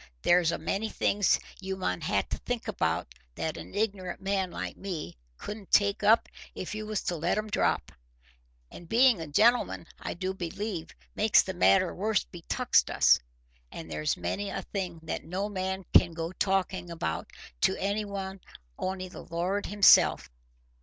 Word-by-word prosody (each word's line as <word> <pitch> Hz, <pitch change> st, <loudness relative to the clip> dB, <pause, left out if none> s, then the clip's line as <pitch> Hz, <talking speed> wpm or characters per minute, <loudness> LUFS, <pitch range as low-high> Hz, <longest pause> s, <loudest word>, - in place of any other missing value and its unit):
There's 175 Hz, -2 st, +4 dB
a 170 Hz, -, -2 dB
many 215 Hz, +3 st, -2 dB
things 205 Hz, -2 st, +2 dB, 0.2 s
you 190 Hz, 0 st, -4 dB
mun 90 Hz, -, -2 dB
ha' -, -, 0 dB
to -, -, -3 dB
think -, -, -4 dB
about -, -, -1 dB, 0.2 s
that 160 Hz, -, -3 dB
an -, -, -9 dB
ignorant 200 Hz, -4 st, -2 dB
man 195 Hz, -1 st, -1 dB
like -, -, -5 dB
me 170 Hz, -, -5 dB, 0.2 s
couldn't 205 Hz, -2 st, -8 dB
take 200 Hz, -1 st, +3 dB
up 215 Hz, +2 st, +5 dB, 0.3 s
if 185 Hz, -, -5 dB
you 215 Hz, 0 st, -5 dB
was 215 Hz, -2 st, -2 dB
to 175 Hz, -, -1 dB
let 170 Hz, +5 st, 0 dB
'em 215 Hz, 0 st, -3 dB
drop. -, -, +1 dB, 0.8 s
And 170 Hz, -, -12 dB
being 240 Hz, -4 st, +5 dB
a 160 Hz, -, -5 dB
gentleman, 220 Hz, +5 st, +3 dB
I -, -, -5 dB
do 185 Hz, +2 st, -2 dB
believe, 190 Hz, 0 st, -4 dB, 0.2 s
makes -, -, +5 dB
the -, -, -4 dB
matter 95 Hz, +1 st, +4 dB
worse 210 Hz, +3 st, 0 dB
betuxt 170 Hz, -2 st, +1 dB
us. -, -, +5 dB, 0.5 s
And 80 Hz, 0 st, -8 dB
there's 75 Hz, 0 st, -1 dB
many 195 Hz, -, -3 dB
a 195 Hz, 0 st, -4 dB
thing 180 Hz, -5 st, -4 dB
that 160 Hz, -, -4 dB
no 190 Hz, +4 st, -3 dB
man 190 Hz, -1 st, -3 dB
can 170 Hz, -2 st, +6 dB
go 165 Hz, 0 st, -3 dB
talkin' 190 Hz, -2 st, -1 dB
about 120 Hz, -, -3 dB, 0.3 s
to -, -, +3 dB
any 200 Hz, +2 st, -1 dB
but 195 Hz, -1 st, -5 dB, 0.4 s
only 185 Hz, 0 st, -3 dB
the 180 Hz, -, -10 dB
Lord 180 Hz, +4 st, -2 dB
himself. 205 Hz, -, +5 dB
190 Hz, 165 wpm, -29 LUFS, 170-205 Hz, 0.8 s, can